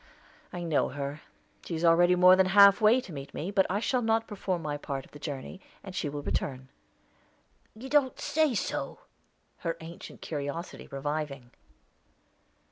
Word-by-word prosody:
I 175 -1 -5
know 165 -4 +1
her. 140 +2 -5 0.4
She 170 - -4
is 165 +2 -1
already 175 +2 +5
more 180 +1 +7
than 190 0 +3
half 200 +2 +7
way 220 +4 +5
to 185 - -11
meet 140 -1 -8
me; 175 +6 -3
but 195 -1 +3
I 200 +3 0
shall 250 +3 0
not 225 0 +1
perform 190 -4 -3
my 150 -1 -2
part 140 -2 -5
of - - -22
the 145 - -12
journey, 145 +5 -6 0.2
and 190 - -9
she 150 - -2
will 145 0 -6
return." 130 -2 -3 1.1
"You 240 +5 -9
don't 275 -2 +2
say 310 -4 +1
so!" - - -3 0.6
her 165 -1 -3
ancient 165 +1 -10
curiosity 150 +3 -5
reviving. 140 -3 -4
170 Hz, 165 wpm, -29 LUFS, 145-200 Hz, 1.1 s, more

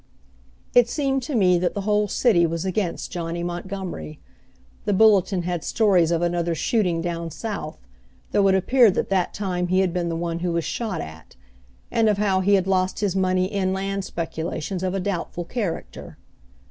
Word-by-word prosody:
It 245 -1 +5
seemed 270 -2 0
to 260 +2 -4
me 180 -5 +4
that 180 +3 -1
the 200 - -2
whole 210 +1 +1
city 185 -6 +3
was 165 +2 -3
against 185 -2 -2
Johnny 170 -1 -3
Montgomery. 175 - -5 0.7
The 205 - +1
Bulletin 195 -3 +4
had 175 -2 -3
stories 190 -7 +3
of 170 0 +1
another 170 -1 0
shooting 180 - 0
down 170 -1 -3
South, 200 -5 -5 0.5
though 200 -1 +3
it 190 - +4
appeared 225 +2 +4
that - - -1
that 190 -2 +1
time 180 -3 -2
he 185 +1 +3
had 185 -3 0
been 175 -2 -1
the 165 - -2
one 170 0 -3
who 175 0 -1
was 170 -1 -1
shot 215 -7 -3
at; 80 +1 -11 0.6
and 225 -1 +3
of 210 - +2
how 200 -2 +2
he 200 +2 +4
had 190 -2 +1
lost 190 0 0
his 200 -3 0
money 185 -1 +2
in 190 -1 -1
land 195 +1 -2
speculations 165 +1 -4
of 185 0 -1
a - - 0
doubtful 175 -2 -3
character. 200 -3 -5
185 Hz, 185 wpm, -23 LUFS, 170-200 Hz, 0.7 s, It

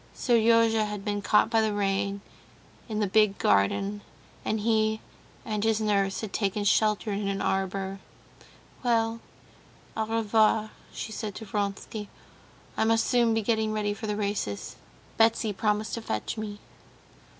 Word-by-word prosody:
Seryozha 230 -2 +3
had 210 -1 -6
been 205 -1 -1
caught 210 +2 +3
by 225 -1 +4
the 215 -1 0
rain 200 0 0 0.7
in 215 -1 -2
the 210 - +2
big 205 0 +3
garden, 195 - +1 0.4
and 220 -1 -1
he 220 0 +2 0.5
and 215 -3 -2
his 225 -1 +2
nurse 200 -3 +1
had 215 -3 -6
taken 205 0 0
shelter 210 +1 +2
in 200 0 -2
an 195 0 -1
arbor. 195 0 -1 0.8
"Well, 230 -2 +1 0.8
au 220 -1 -1
revoir," 220 -1 +2 0.2
she 220 - -6
said 215 -2 -5
to 220 - -7
Vronsky. 205 +1 -3 0.7
"I - - +1
must 225 0 +3
soon 235 -3 +3
be 225 - 0
getting 220 0 +1
ready 210 -1 0
for 215 +1 -6
the 210 - -1
races. 200 - -3 0.4
Betsy 225 -1 +3
promised 210 +2 -1
to 230 - -3
fetch 110 - -3
me." 215 -2 -5
215 Hz, 150 wpm, -27 LUFS, 200-220 Hz, 0.8 s, by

